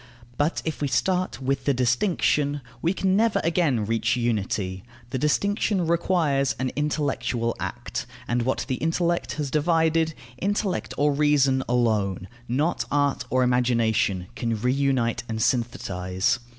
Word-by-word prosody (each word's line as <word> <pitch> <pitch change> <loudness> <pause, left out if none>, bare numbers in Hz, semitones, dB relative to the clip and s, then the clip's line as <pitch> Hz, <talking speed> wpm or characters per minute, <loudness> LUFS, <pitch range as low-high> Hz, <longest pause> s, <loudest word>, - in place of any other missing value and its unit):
But 145 +5 0
if 160 -2 -3
we 145 - +1
start 180 +8 0
with 135 0 -1
the 140 - +2
distinction, 145 - +1 0.2
we 170 - +2
can 190 0 +1
never 225 +1 +3
again 160 - +1
reach 115 +2 +1
unity: 100 -5 -1 0.3
the 130 - -1
distinction 200 - +1
requires 160 -7 +1
an 130 +1 -1
intellectual 140 -5 -1
act, - - -4 0.2
and 120 +1 +1
what 130 +3 -1
the 130 -2 -1
intellect 170 +1 0
has 145 -3 -3
divided 160 0 +2 0.2
intellect 200 -1 -1
or 145 +1 +3
reason 140 -2 +3
alone, 105 -6 +1 0.2
not 145 +8 0
art 140 -3 +1
or 130 0 +2
imagination, 115 -6 +1
can 115 -2 -2
reunite 130 -1 +1
and 110 - -2
synthetize. 95 -5 0
135 Hz, 135 wpm, -25 LUFS, 120-160 Hz, 0.3 s, never